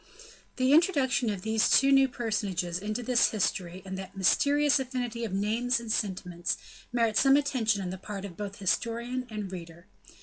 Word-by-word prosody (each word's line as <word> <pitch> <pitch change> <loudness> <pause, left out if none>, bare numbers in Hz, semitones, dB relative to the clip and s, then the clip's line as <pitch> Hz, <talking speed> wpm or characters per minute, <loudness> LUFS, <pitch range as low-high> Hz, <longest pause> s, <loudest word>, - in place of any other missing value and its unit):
The 260 +1 +2
introduction 280 - +3
of 200 -3 -4
these 220 0 +2
two 275 +1 +5
new 270 0 +6
personages 200 -8 -2
into 215 +4 -4
this 240 0 +3
history 185 -3 -2
and 190 0 -5
that 195 +1 -9
mysterious 285 +9 +3
affinity 245 -3 -3
of 215 - -5
names 225 +5 0
and 230 -2 -5
sentiments, 180 -5 -2 0.3
merit 230 -3 +1
some 270 +1 +5
attention 225 -8 0
on 180 - -4
the 185 - -7
part 200 0 -6
of 185 -4 -9
both 200 0 -6
historian 235 +5 -2
and 210 -3 -5
reader. 170 -1 -9
220 Hz, 170 wpm, -28 LUFS, 190-250 Hz, 0.3 s, new